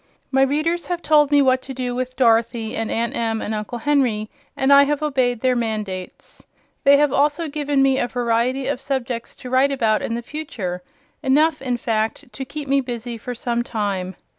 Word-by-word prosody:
My 270 0 +3
readers 310 +6 +1
have 350 -1 -3
told 295 -1 +4
me 290 -1 +5
what 260 -1 +3
to 265 0 -8
do 250 -1 -2
with 255 +1 -3
Dorothy, 230 -2 +2
and 225 -1 -2
Aunt 230 +1 -1
Em 225 -1 -1
and 220 - -3
Uncle 215 +3 -4
Henry, 240 -5 +1 0.3
and 270 +1 +4
I 280 - +9
have 295 +1 -1
obeyed 255 -5 +1
their 255 -1 +2
mandates. 215 -6 -4 0.4
They 280 -1 +7
have 290 -2 +2
also 295 +3 +1
given 290 -2 0
me 270 -1 +3
a 245 - 0
variety 245 +2 0
of 270 -1 -2
subjects 255 -3 -3
to 250 - -9
write 265 +2 +4
about 225 -5 +1
in 230 - -2
the 235 - -4
future: 225 - -5 0.4
enough, 300 +3 +2
in 250 -2 -1
fact, 225 0 -2
to 270 - -5
keep 295 +2 -6
me 275 +1 +3
busy 240 -2 -5
for 245 +2 -6
some 235 0 -1
time. 200 -6 -3
255 Hz, 195 wpm, -21 LUFS, 230-280 Hz, 0.4 s, I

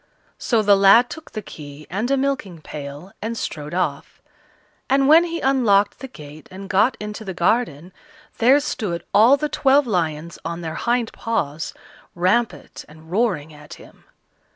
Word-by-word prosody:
So 230 -3 +1
the 205 -1 +5
lad 195 +5 +6
took 320 - -9
the 215 - -5
key 150 -4 -11
and 210 +7 -3
a 275 - +2
milking 265 -11 -2
pail, 150 +4 -9
and 225 +2 -4
strode 150 -3 -5
off; 185 - -3 0.7
and 270 0 +3
when 320 +4 +7
he 335 -1 -4
unlocked 220 -7 +2
the 265 - -7
gate 150 - -13
and 195 +1 -9
got 210 +6 +2
into 210 +1 -6
the 190 -3 -6
garden, 175 - 0 0.5
there 255 +5 +5
stood 200 - -3
all 235 +7 +6
the 300 - -1
twelve 285 -1 +3
lions 170 -6 -2
on 170 +1 -5
their 160 -2 -5
hind 235 +2 -1
paws, 165 -9 -3 0.4
rampant 190 +7 -1
and 160 +1 -16
roaring 185 -8 0
at 150 0 -12
him. - - -18
200 Hz, 160 wpm, -21 LUFS, 165-245 Hz, 0.7 s, when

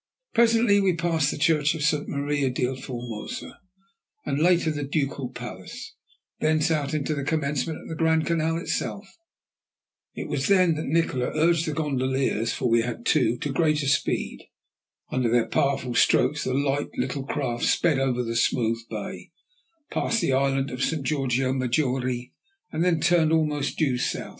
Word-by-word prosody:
Presently 230 -3 +4
we 190 -3 +2
passed 165 -4 +1
the - - -3
church 150 0 +2
of 155 - -3
St. 150 -1 +1
Maria 140 -1 0
del 125 +1 -1
Formosa, 120 -4 -7 0.7
and 140 0 -1
later 170 -1 +3
the 145 -1 -4
Ducal 140 -2 -2
Palace, 120 -7 -8 0.5
thence 155 +1 +2
out 150 -1 0
into 155 +1 -1
the 140 -2 -3
commencement 150 0 -1
of - - -11
the - - -5
Grand 160 0 +2
Canal 165 -1 0
itself. 195 +3 -3 1.1
It - - -5
was 140 -2 -1
then 185 -4 +4
that 155 0 -4
Nikola 140 -5 +1
urged 165 +1 +2
the 155 - -1
gondoliers, 130 -6 0
for 125 - -1
we 115 0 +4
had 115 0 -5
two, 120 - +2
to 140 +2 -3
greater 150 -2 +1
speed. 135 - -1 0.6
Under 125 -2 +1
their 120 0 +3
powerful 135 -3 0
strokes 150 +4 +3
the 130 - -1
light 140 +1 0
little 140 - -2
craft 125 -6 -2
sped 160 -6 +2
over 125 -2 0
the 115 0 -3
smooth 115 -1 +1
bay, - - -6 0.6
passed 230 - 0
the 135 - +1
island 135 0 +1
of 125 +1 -3
St. 160 -4 -1
Georgio 135 -3 0
Maggiore, 125 -1 -1 0.4
and 165 - 0
then 175 -3 +2
turned 165 -1 +3
almost 150 -3 0
due 135 -6 +1
south. - - -2
145 Hz, 160 wpm, -25 LUFS, 130-160 Hz, 1.1 s, Presently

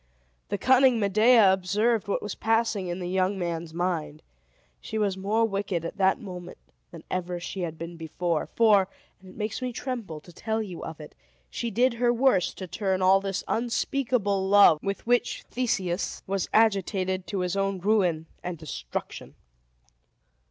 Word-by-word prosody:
The 205 - -1
cunning 255 +2 +4
Medea 215 0 +5
observed 205 +4 0
what 200 - -1
was 210 - -4
passing 225 -4 0
in 175 0 -3
the 180 -1 -4
young 190 +2 0
man's 170 -2 -3
mind. 165 -3 -3 0.6
She 220 - -5
was 205 -3 +1
more 210 +4 +1
wicked 195 -5 -2
at - - -6
that 190 +4 +3
moment 180 -5 -8 0.3
than 170 -2 -11
ever 180 -1 -2
she 185 +2 -5
had 165 -2 -4
been 170 +1 -7
before; 165 0 -2
for 210 -4 +5 0.3
(and 190 0 -15
it - - -14
makes 215 +3 -3
me 250 -1 -2
tremble 230 - -5
to 175 - -16
tell 220 +4 -2
you 195 -6 -6
of 160 0 -7
it) 150 - -11 0.4
she 235 - -3
did 245 +2 +2
her 240 -1 +4
worst 240 -6 +2
to 185 - -6
turn 190 0 -1
all 190 +1 +5
this 195 -1 -3
unspeakable 230 -4 0
love 200 -6 +7
with 195 0 -4
which 245 +1 +1
Theseus 195 -8 -2
was 195 -1 -2
agitated 190 -3 +1
to 195 -3 -2
his 180 +1 -1
own 195 0 0
ruin 180 -5 +1 0.2
and 180 -1 -5
destruction. 155 -2 -6
195 Hz, 165 wpm, -26 LUFS, 180-220 Hz, 0.6 s, love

